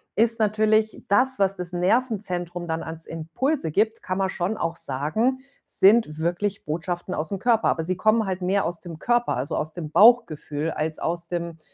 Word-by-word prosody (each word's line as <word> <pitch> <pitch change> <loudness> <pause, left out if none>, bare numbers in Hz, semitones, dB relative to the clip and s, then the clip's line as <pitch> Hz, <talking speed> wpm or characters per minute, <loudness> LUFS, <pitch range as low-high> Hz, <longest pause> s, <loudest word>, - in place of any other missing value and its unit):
ist 230 +1 +3
natürlich 215 0 +1
das, 255 +5 +3
was 195 0 +2
das 180 -1 -5
Nervenzentrum 180 -3 -1
dann 160 0 -2
als 160 0 -7
Impulse 165 - -2
gibt, 220 +6 0
kann 185 +1 -3
man 190 -1 0
schon 190 +4 -2
auch 165 0 -2
sagen, 165 - -1 0.3
sind 195 -6 +3
wirklich 175 +5 -2
Botschaften 175 +4 -3
aus 155 +5 -2
'm 195 - -3
Körper. 230 +1 +2
Aber 160 - -1
sie 185 +2 -1
kommen 215 +4 +2
halt 190 -1 -3
mehr 195 +2 +1
aus 170 0 -3
dem 165 -3 -9
Körper, 240 - +1
also, 130 +3 -3
aus 155 - -3
dem 165 -4 -6
Bauchgefühl 160 -9 +3
als 155 0 -3
aus 170 +1 -2
dem 170 -2 -4
180 Hz, 185 wpm, -24 LUFS, 165-215 Hz, 0.3 s, ist